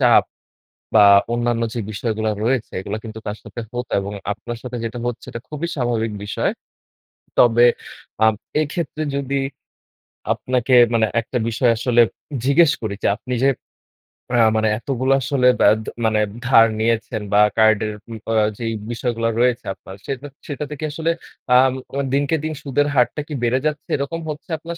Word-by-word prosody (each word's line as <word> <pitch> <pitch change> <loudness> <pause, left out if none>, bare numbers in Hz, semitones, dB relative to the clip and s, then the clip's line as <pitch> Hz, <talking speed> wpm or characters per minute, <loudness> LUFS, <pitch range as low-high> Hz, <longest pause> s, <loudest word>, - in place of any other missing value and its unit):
চাপ - - +6 0.7
বা 110 - +8 0.3
অন্যান্য 120 -1 0
যে 120 - -3
বিষয়গুলা 110 0 -1
রয়েছে 125 0 0
এগুলা 100 +3 -4
কিন্তু 110 0 -8
তার 105 +1 -3
সাথে 120 - -8
হতো 125 0 -5
এবং 100 +1 -5 0.2
আপনার 115 +3 -6
সাথে 125 -1 -5
যেটা 115 +1 -4
হচ্ছে 120 -1 -5
এটা 115 - -6
খুবই 155 +3 -3
স্বাভাবিক 120 -4 -1
বিষয়। 105 - -1 0.9
তবে 120 0 +6 0.6
আ - - +7 0.4
এক্ষেত্রে 155 0 -3
যদি 140 0 -1 0.9
আপনাকে 125 0 0 0.2
মানে 110 -1 +3
একটা 120 +2 -3
বিষয় 120 +2 +2
আসলে 120 0 +4 0.4
জিজ্ঞেস 145 +3 +5
করি 105 -2 -2
যে - - +2
আপনি 125 +3 -8
যে 135 - +5 0.9
আ - - +4 0.2
মানে 110 0 +2
এতগুলো 130 +1 -1
আসলে 125 +1 +2
ব্যা - - +6
দা - - -5 0.2
মানে 110 -1 +2 0.3
ধার 115 -2 +6
নিয়েছেন 110 -1 0
বা 105 - +6 0.2
কার্ডের 110 -1 +3 0.2
উ - - -5 0.2
আ - - +1 0.2
যেই 115 -1 -3 0.2
বিষয়গুলা 115 -1 -1
রয়েছে 125 0 +2
আপনার 95 0 -12
সেটা 135 +1 -4 0.2
সেটা 145 0 -4
থেকে 150 +1 -6
আসলে 160 +2 0 0.4
আ - - +9 0.2
মু 130 - -5 0.3
দিনকে 145 +3 +2
দিন 155 0 -2
সুদের 145 +1 +1
হারটা 125 +4 +2
কি 150 - -6
বেড়ে 125 +2 +2
যাচ্ছে? 150 -1 -2
এরকম 140 +4 -3
হচ্ছে 150 +4 -7
আপনার 170 +2 -7
120 Hz, 160 wpm, -21 LUFS, 115-140 Hz, 0.9 s, আ